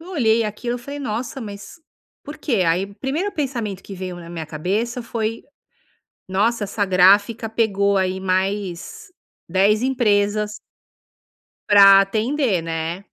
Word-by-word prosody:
eu 350 +3 -12
olhei 230 -8 +2
aquilo, 235 +3 -3
eu - - -8
falei: 280 +4 -8
"Nossa, 245 +1 -4
mas 200 -1 -9 0.5
por 290 +2 -9
quê?", 230 -10 0
aí 175 +4 +1
1º 310 +10 -2
pensamento 235 - -3
que 195 - -9
veio 185 -1 -6
na 170 -1 -10
minha 165 -2 -6
cabeça 210 - -2
foi: 225 -1 -3 0.9
"Nossa, 210 +4 +1
essa 205 +1 -1
gráfica 200 +5 +4
pegou, 200 -3 +1
aí, 190 0 0
mais 190 - -2 0.4
10 200 +4 +3
empresas 210 -5 +1 1.1
"para 195 -1 +8
atender, 220 - 0
né". 165 +3 -4
205 Hz, 130 wpm, -21 LUFS, 190-235 Hz, 1.1 s, para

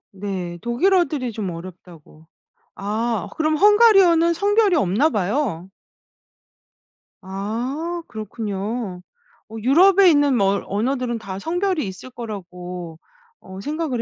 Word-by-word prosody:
네 185 -3 -5
독일어들이 275 0 +1
좀 205 -4 -4
어렵다고 165 -2 -12 0.5
아 215 0 -2
그럼 310 0 +1
헝가리어는 390 -5 +5
성별이 405 +2 +2
없나 240 - +2
봐요. 200 - -2 1.5
아 245 - -4
그렇군요. 215 -2 -5 0.5
어 225 - -10
유럽에 370 - +6
있는 290 -4 +3
뭐 195 -1 +3
어 - - -4
언어들은 240 +3 -1
다 195 -3 -7
성별이 355 - -1
있을 190 +7 -9
거라고 180 -7 -8 0.4
어 190 0 -11
생각을 295 -3 -2
235 Hz, 240 characters per minute, -21 LUFS, 190-315 Hz, 1.5 s, 유럽에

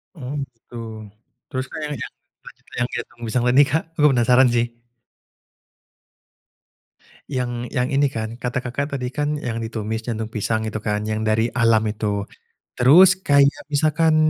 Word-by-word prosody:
Oh 135 -4 -6 0.2
gitu, 115 +1 -17 0.8
terus, 130 0 -2
Kak, - - -7
yang 150 0 -3
yang 135 - -6
jantung - - -11
lanjut - - -36
yang 120 - +1
jantung 120 +1 -7
pisang 120 +2 0
tadi 125 +3 +6
Kak, 160 +3 0
aku 150 -1 +6
penasaran 125 +1 +5
sih. 120 -1 +2 2.6
Yang 125 -3 -2 0.2
yang 125 +1 0
ini 140 +1 +3
kan, 115 -2 -5
kata 125 +1 -2
Kakak 140 +3 -3
tadi 125 -2 -3
kan 150 +2 -1
yang 115 -2 -3
ditumis 110 -1 -3
jantung 110 -1 -3
pisang 110 +1 -1
itu 110 0 -3
kan 105 0 -2
yang 110 0 -2
dari 110 +2 +2
alam 115 -2 +3
itu, 105 -1 -2 0.5
terus 175 +9 +7
kayak 140 -5 +3
misalkan 155 +2 +3
125 Hz, 155 wpm, -22 LUFS, 110-140 Hz, 2.6 s, terus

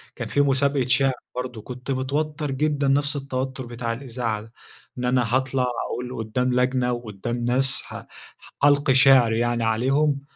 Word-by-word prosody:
كان - - -5
في 145 - +2
مسابقة 140 -1 +1
شِعر، 135 +1 +3 0.2
برضه 125 -3 -5
كنت 125 +4 -7
متوتر 145 +3 -2
جدًا 145 0 0
نفس 140 +2 +2
التوتر 130 -1 -4
بتاع 120 -1 -4
الإذاعة 115 -3 -3
ده، 115 +2 -15 0.4
إن 125 - -3
أنا 125 -1 +1
هاطلع 130 0 +1 0.2
أقول 125 +1 -5
قُدام 125 +3 -1
لجنة 125 0 +1
وقُدام 120 0 -4
ناس 130 +2 +2
ه - - -8 0.6
هالقي 145 -2 +4
شِعر 130 -3 +6
يعني 120 +1 0
عليهم. 135 +6 +1
130 Hz, 150 wpm, -23 LUFS, 120-135 Hz, 0.6 s, شِعر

